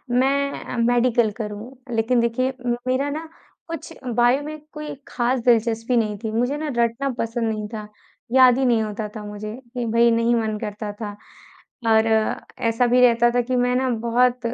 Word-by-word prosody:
मैं 275 0 0
मेडिकल 240 -2 +3
करूँ, 210 +2 -6 0.2
लेकिन 235 +2 +2
देखिए 245 +3 0
म 240 - +1
मेरा 265 +3 +1
ना 315 +2 -5 0.4
कुछ 330 0 -7 0.2
बायो 245 +3 +4
में 310 +1 -6
कोई 300 -1 -6
खास 250 +1 0
दिलचस्पी 230 +1 +2
नहीं 215 -2 0
थी, 220 - -2
मुझे 245 +6 0
ना 310 - -4
रटना 235 +4 +1
पसंद 230 0 -1
नहीं 215 -1 -4
था, 215 -1 -6 0.4
याद 255 -1 +6
ही 265 - +1
नहीं 235 -3 +3
होता 215 0 -4
था 215 - -6
मुझे। 210 +1 -6 0.2
कि 245 -2 -2
भई 235 +1 +5
नहीं 230 +1 +2
मन 220 -2 -1
करता 210 0 -4
था 210 -2 -3 0.8
और 220 0 +5 0.6
ऐसा 230 +2 +2
भी 250 +1 +4
रहता 240 -1 +5
था 245 - +4
कि 255 +2 -2
मैं 250 0 +2
ना 260 0 +1
बहुत 240 +2 +2
240 Hz, 180 wpm, -22 LUFS, 225-255 Hz, 0.8 s, याद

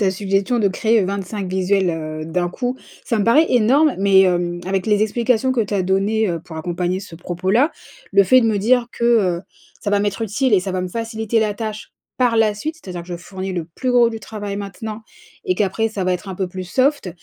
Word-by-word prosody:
ta 195 -2 +3
suggestion 195 +4 0
de 200 - +3
créer 220 +3 +2
25 195 0 -3
visuels, 190 0 +1
heu, 155 -1 -5
d'un 175 +2 -1
coup, 245 +7 -3 0.3
ça 230 - 0
me 205 - +1
paraît 300 +8 +5
énorme, 260 +6 +4
mais 195 -1 +5
hem, 175 -2 +1
avec 190 +1 -1
les 210 -1 +3
explications 235 +3 +1
que 255 -3 +1
tu 205 -1 -2
as 190 - +1
données, 195 +3 +1
heu, 170 - -2
pour 160 -1 -11
accompagner 175 +3 -2
ce 180 -4 -10
propos-là. 190 - 0 0.4
Le 200 0 +6
fait 255 +7 +5
de 230 - +2
me 215 -2 +1
dire 240 +4 +3
que, 235 - -3
heu, 195 -8 +3 0.4
ça 205 - -2
va 205 - +3
m'être 205 +2 -1
utile 225 +2 +1
et 185 - +4
ça 190 - -4
va 185 0 -2
me 185 - -3
faciliter 225 +1 -1
la 215 -1 +1
tâche 215 0 -6 0.2
par 245 -3 +2
la 215 -2 +3
suite, 310 +10 -4
c'est-à-dire 185 - -7
que 170 - -16
je 175 - -4
fournis 190 +2 -6
le 175 -3 -3
plus 175 +11 -4
gros 240 -1 +5
du 225 -1 -6
travail 205 -2 -6
maintenant, 210 +2 -6 0.4
et 185 - +1
qu'après 210 +2 0
ça 205 -4 -4
va 185 - +1
être 180 +2 -4
un 190 - -4
peu 190 - -1
plus 185 +1 -6
soft, 260 +3 +1
200 Hz, 235 wpm, -20 LUFS, 185-225 Hz, 0.4 s, Le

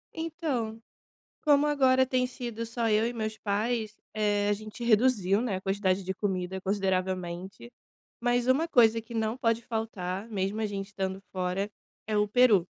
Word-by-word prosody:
Então, 290 -9 -3 0.6
como 295 -1 +4
agora 260 -3 +4
tem 255 -1 +1
sido 235 -2 -5
só 230 -1 -1
eu 215 +2 +3
e 240 - -2
meus 215 -2 -4
pais, 215 +1 -1 0.2
eh, 205 -1 +1
a - - +4
gente 215 +3 -6
reduziu, 215 -4 +3
né, 225 -6 -1
a - - -5
quantidade 195 -1 0
de 190 - -2
comida 190 -1 -2
consideravelmente, 190 +1 -2 0.5
mas 245 0 +1
uma 275 +6 +3
coisa 230 -5 +5
que 235 +2 -12
não 225 +1 -1
pode 230 -2 +1
faltar, 220 -3 -4
mesmo 200 +1 -2
a 220 - +1
gente 195 -1 -4
estando 190 -2 -3
fora, 185 +2 -1 0.4
é 215 -1 0
o 210 - +3
peru. 220 -7 +5
215 Hz, 165 wpm, -29 LUFS, 195-240 Hz, 0.6 s, coisa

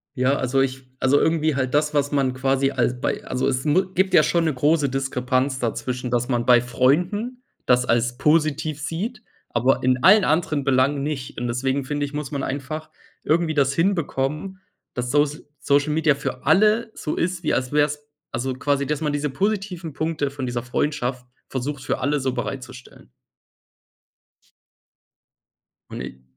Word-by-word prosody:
Ja, 130 +2 +2
also 135 0 0
ich 130 0 -1 0.2
also 130 +2 +3
irgendwie 155 -2 +1
halt 130 -1 -1
das, 150 +1 +2
was 145 0 +1
man 135 -3 +1
quasi 135 +1 +1
als 125 -1 0
bei - - -2
also 130 +1 -1
es 130 -1 0
mu 175 +6 +3
gibt 190 0 +1
ja 155 - +8
schon 170 +2 +1
'ne 155 - +1
große 145 +2 +2
Diskrepanz 130 0 -1
dazwischen, 125 +1 -3
dass 120 0 +1
man 120 -2 0
bei 125 -1 +6
Freunden 180 - 0 0.2
das 125 0 +3
als 120 +1 +1
positiv 155 0 +1
sieht, 215 - -4 0.3
aber 125 +3 +2
in 130 0 +2
allen 205 +1 +7
anderen 155 -2 +1
Belangen 135 +1 +2
nicht 140 -5 -4
und 120 - -2
deswegen 130 +3 -1
finde 145 +1 -1
ich, 140 - -8
muss 150 -2 -4
man 140 -2 -3
einfach 155 +3 -4 0.3
irgendwie 160 +1 +1
das 140 -2 +2
hinbekommen, 165 0 -1 0.3
dass 125 0 -3
Sosl 145 +1 +1
Social 145 +1 +2
Media 155 -2 +3
für 135 -2 -5
alle 215 +8 +4
so 150 - -3
ist, 175 0 -2
wie - - +1
als 125 0 -1
wäre 150 0 +4
es 145 0 -7 0.3
also 130 +2 -2
quasi, 140 +1 0
dass 150 0 -2
man 150 -2 0
diese 145 0 -1
positiven 190 -2 -2
Punkte 150 -2 -2
von 135 -2 -5
dieser 120 -1 -3
Freundschaft 125 -1 -2 0.2
versucht, 135 +1 -4
für - - -2
alle 145 +2 0
so 130 -1 -1
bereitzustellen. 130 - -7 2.8
Und - - -6
i 65 0 -9
140 Hz, 170 wpm, -23 LUFS, 130-155 Hz, 2.8 s, ja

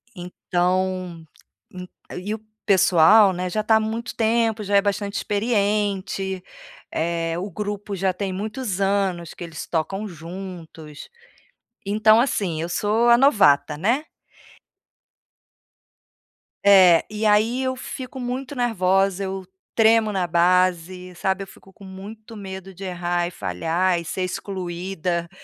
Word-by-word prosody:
então, 180 -1 -2 0.5
en 180 0 -8 0.3
e 195 +4 -4
o 220 - -5 0.3
pessoal 190 +1 +6
né 180 +1 -3
já 215 +4 -1
está 220 +1 +3
há - - +2
muito 220 +2 -4
tempo, 225 -1 +1
já 205 0 0
é - - +5
bastante 200 0 -2
experiente, 200 -3 -1 0.5
eh, 165 0 -1
o 195 +3 -4
grupo 205 +1 -4
já 190 0 0
tem 190 +1 -4
muitos 210 0 -4
anos 195 -4 0
que - - -9
eles 165 -3 -7
tocam 195 +6 -2
juntos. 165 -3 -9 0.8
Então, 215 +2 +4
assim, 190 - -1
eu 170 - -3
sou 215 +6 +1
a 235 0 +7
novata, 175 - +4
né? 235 - 0 2.6
É, 185 -4 +7
e 215 +1 -3
aí 220 +5 +3
eu 260 0 -1
fico 260 +1 -7
muito 255 +3 -4
nervosa, 195 -5 +1
eu 190 -1 -5 0.3
tremo 225 -1 +4
na 190 -3 0
base, 180 +1 +1
sabe, 190 +2 -1
eu - - -11
fico 190 - -17
com 195 +1 -15
muito 210 +4 -10
medo 190 -2 -8
de 190 +2 -10
errar, 175 -1 -1
e 175 - -7
falhar, 170 - -1
e - - -7
ser 185 +3 -3
excluída 180 -2 -3
195 Hz, 135 wpm, -23 LUFS, 180-215 Hz, 2.6 s, a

